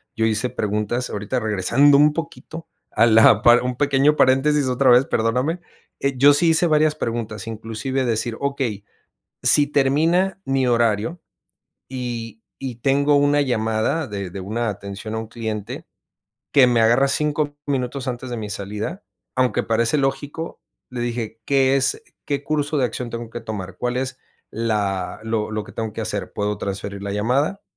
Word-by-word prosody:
yo 110 - +1
hice 110 +3 0
preguntas, 105 +4 -2
ahorita 105 +5 -2
regresando 115 +7 +3
un 150 +1 +5
poquito 165 0 -7 0.2
a 110 - +4
la 110 -1 +6 0.2
un 125 0 -2
pequeño 145 +1 +3
paréntesis 135 +1 +3
otra 130 +1 +2
vez, 125 +2 +6
perdóname. 125 +11 0 0.4
Eh, 140 -1 -1
yo 145 +3 +7
sí 165 +4 +3
hice 160 +2 +3
varias 155 -1 +3
preguntas, 115 -5 -4
inclusive 115 +4 -3
decir: 115 0 -1
"Okey, 135 -7 -2 0.6
si 145 -1 +5
termina 160 +8 +2
mi 135 -1 +1
horario 115 - +1 0.7
y 120 -4 -5 0.2
y 130 -3 -5
tengo 140 +4 +2
una 145 +1 +3
llamada 115 +3 0
de 100 -3 -5
de 95 - -7
una 110 +5 -2
atención 100 +1 -6
a - - -2
un 110 -1 -6
cliente 110 -3 -5 0.7
que 135 -3 +6
me 120 -2 +2
agarra 120 +5 +4
5 150 +1 0
minutos 135 -1 -2
antes 125 +1 -5
de 120 - -4
mi 105 -2 -5
salida". 105 - -5 0.3
Aunque 130 -1 +1
parece 115 +4 +1
lógico, 140 +3 -3 0.3
le 125 - -5
dije: 115 -2 -4
"¿Qué 135 -1 +3
es? 135 0 +1 0.2
¿Qué 140 -1 -2
curso 150 0 -1
de 135 - +2
acción 120 +1 -3
tengo 115 -1 -6
que 120 - -6
tomar? 100 -5 -7
¿Cuál 125 0 -2
es 130 0 -3 0.3
la 105 -5 -2
lo 110 -1 -2
lo 110 -1 -3
que - - -13
tengo 110 -2 -4
que 110 - -4
hacer? 105 -2 -4
¿Puedo 105 0 -2
transferir 100 0 -5
la 100 - -4
llamada? 130 - 0
120 Hz, 165 wpm, -21 LUFS, 110-140 Hz, 0.7 s, yo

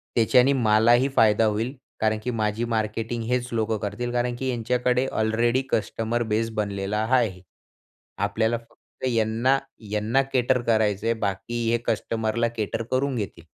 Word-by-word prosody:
त्याच्याने 125 +4 +4
मलाही 120 +1 +4
फायदा 110 0 +4
होईल 110 +5 -1 0.2
कारण 110 0 +1
की 125 - -1
माझी 110 +1 -1
मार्केटिंग 110 +2 -2
हेच 125 0 0
लोकं 110 -1 0
करतील 105 +4 -4
कारण 120 0 0
की 130 -1 -2
यांच्याकडे 125 +1 +1
ऑलरेडी 115 +3 +1
कस्टमर 115 +2 -1
बेस 115 +1 +1
बनलेला 100 +1 -1
हाआहे. 115 -7 +1 0.8
आपल्याला 110 +4 0
फक्त 115 +2 -12
यांना 115 +3 +2 0.3
यांना 110 +5 +2
केटर 125 0 +2
करायचं 110 -3 +1
आहे 115 - +3
बाकी 115 +4 -2
हे 120 - +3
कस्टमरला 115 +1 0
केटर 110 +1 -2
करून 130 +1 +1
घेतील. 100 -6 -5
115 Hz, 140 wpm, -25 LUFS, 110-120 Hz, 0.8 s, त्याच्याने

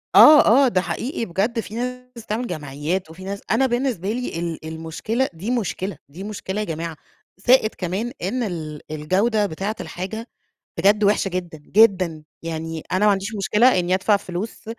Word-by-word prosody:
آه، 300 -1 +10 0.2
آه، - - +4
ده 185 -7 +2
حقيقي 235 +4 -3
بجد، 215 +6 -1
في 215 -1 -6
ناس 250 -1 -5
بتعمل 230 +4 -2
جمعيات، 155 +2 -3
وفي 170 +4 -11
ناس 200 +1 -5
أنا 255 +4 +4
بالنسبة 240 -6 -1
لي 245 -8 -3
ال 170 -2 -4
المشكلة 165 +11 -2
دي 185 +8 -4
مشكلة، 200 - -2
دي 170 +7 -9
مشكلة 205 -1 -4
يا - - -2
جماعة، 165 -1 -4 0.4
زائد 225 +2 +3
كمان 195 +7 -2
إن 240 +8 -1
ال 155 -7 -5
الجودة 195 +8 +1
بتاعة 195 +4 -3
الحاجة 220 +6 -6 0.5
بجد 205 +2 +4
وحشة 200 -1 +3
جدًا، 175 -3 -4
جدًا، 185 -2 +3 0.2
يعني 165 -1 -4
أنا 185 +3 +2
ما - - +6
عنديش 200 +3 -3
مشكلة 210 +3 +4
إني 180 +1 +1
أدفع 200 +2 +3
فلوس 200 +2 -6
195 Hz, 165 wpm, -22 LUFS, 170-225 Hz, 0.5 s, آه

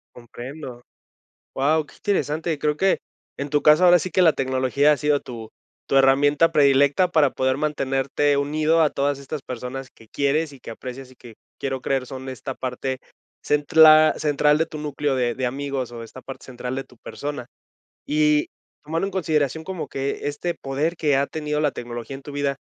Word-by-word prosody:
Comprendo. 125 +2 -9 0.7
Wao, 150 +3 +1
qué - - -18
interesante. 160 -5 -1
Creo 150 0 0
que, 190 +4 +2 0.4
en 140 - -3
tu 145 0 +1
caso, 150 +4 +6
ahora 175 0 +7
sí 180 +3 -4
que 185 - +1
la 165 -3 +6
tecnología 130 +2 +2
ha - - +1
sido 145 0 +1
tu 115 -3 -9 0.4
tu 135 - +1
herramienta 145 +4 +4
predilecta 140 +3 +4
para 155 -5 +4
poder 130 +1 0
mantenerte 140 -1 0
unido 155 +3 +1
a 155 - +5
todas 140 0 -1
estas 140 +1 -6
personas 130 +2 -6
que 115 - -19
quieres 145 +3 0
y - - -14
que - - -10
aprecias 125 +3 -8
y - - -17
que 120 -2 -14 0.2
quiero 135 -1 -3
creer 135 -1 -1
son 130 0 -7
esta 130 +1 -6
parte 130 +1 -4 0.4
central- 155 +1 +6
central 150 0 +2
de 160 - +2
tu 155 -1 -9
núcleo 145 -1 -2
de 120 -2 0
de 130 - -3
amigos 135 -1 -3
o 115 -1 -7
esta 120 +3 -11
parte 135 - -10
central 125 0 -5
de 135 0 -4
tu 125 - -21
persona. 145 +1 -6 0.6
Y 150 0 +2 0.4
tomando 165 +5 -1
en 195 - -6
consideración 160 -4 0
como 185 0 -5
que 135 +1 -4
este 150 +4 -2
poder 145 +5 -2
que 150 -4 +2
ha 140 +1 +1
tenido 150 -1 -2
la 150 -1 +2
tecnología 120 +1 -7
en 135 - -13
tu 145 - -9
vida, 140 -1 -1
140 Hz, 190 wpm, -23 LUFS, 130-150 Hz, 0.7 s, ahora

